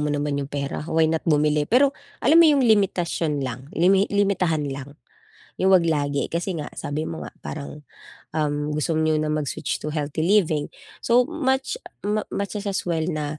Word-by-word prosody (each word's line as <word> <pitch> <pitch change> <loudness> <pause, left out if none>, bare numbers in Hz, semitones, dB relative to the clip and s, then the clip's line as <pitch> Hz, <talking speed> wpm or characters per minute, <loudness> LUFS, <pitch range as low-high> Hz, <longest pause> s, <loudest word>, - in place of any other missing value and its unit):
mo 150 - 0
naman 145 -1 -1
yung 140 - -5
pera, 140 -1 -3
why 160 0 +3
not 160 0 +1
bumili? 150 -1 +2
Pero 270 +3 +4 0.3
alam 325 +2 +7
mo - - +8
yung 280 -3 +4
limitasyon 175 - +1
lang, 130 +2 -6
limi 190 +4 +4
limitahan 190 -6 +1
lang. 140 +1 -8 0.6
Yung 190 0 +4
'wag 180 - +6
lagi, 145 -4 0
kasi 170 +2 -2
nga 150 -2 -5
sabi 145 +2 -3
mo 160 0 -5
nga - - -12
parang, 150 0 -7 0.5
um, 150 -1 -1
"Gusto 155 +1 0
niyo 155 0 +2
na 155 0 0
mag-switch 150 -3 -2
to 150 0 -5
healthy 150 +1 -2
living." 165 -7 +2 0.3
so 240 +1 +3
much 270 - -1 0.2
mu 210 +1 -1
much 200 +1 -3
as 205 - -7
as 200 -1 -1
well 165 -3 -1
na, 155 -3 -3
160 Hz, 185 wpm, -23 LUFS, 150-200 Hz, 0.6 s, mo